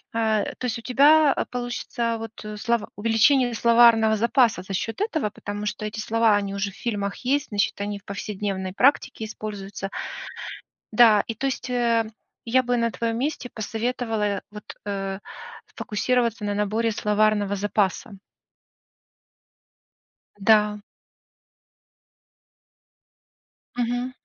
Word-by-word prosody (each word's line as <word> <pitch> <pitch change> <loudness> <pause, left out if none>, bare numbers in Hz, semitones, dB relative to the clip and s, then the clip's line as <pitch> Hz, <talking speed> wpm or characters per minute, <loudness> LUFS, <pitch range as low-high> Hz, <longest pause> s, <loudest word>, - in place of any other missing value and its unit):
э, 220 -2 +2
то - - -5
есть 240 - -2
у - - -10
тебя 285 +4 +5 0.2
получится 245 -1 -2
вот 215 -1 -8
слова 235 0 0
увеличение 235 +4 +3
словарного 230 -1 +5
запаса 235 -2 +3
за 195 - -7
счет 225 - -3
этого, 315 - 0
потому 205 +1 -6
что 215 0 -3
эти 215 +1 -5
слова- 225 0 +3
они 200 -1 -1
уже 200 0 -2
в - - -18
фильмах 200 -4 -3
есть, 285 +3 +1
значит, 205 -1 -1
они 205 0 -3
в 195 - -32
повседневной 195 -2 -4
практике 250 -1 +2
используются. 205 -2 -6 1.0
Да, 220 -2 +6
и 230 - -3
то 275 - -3
есть, 265 -1 -3
э, 235 -2 +2 0.4
я 255 +2 +3
бы 245 0 0
на 230 -1 +1
твоем 230 +3 -2
месте 280 -1 -2
посоветовала, 225 +1 -2
э, 200 -2 -1
вот, 210 0 -10 0.2
э, 195 -1 -3 0.6
сфокусироваться 235 0 0
на 205 0 -1
наборе 215 +3 0
словарного 210 -1 +1
запаса. 205 +1 -1 2.2
Да. 210 0 +3 3.0
Мгм. 245 +1 -1
220 Hz, 125 wpm, -24 LUFS, 205-240 Hz, 3.0 s, Да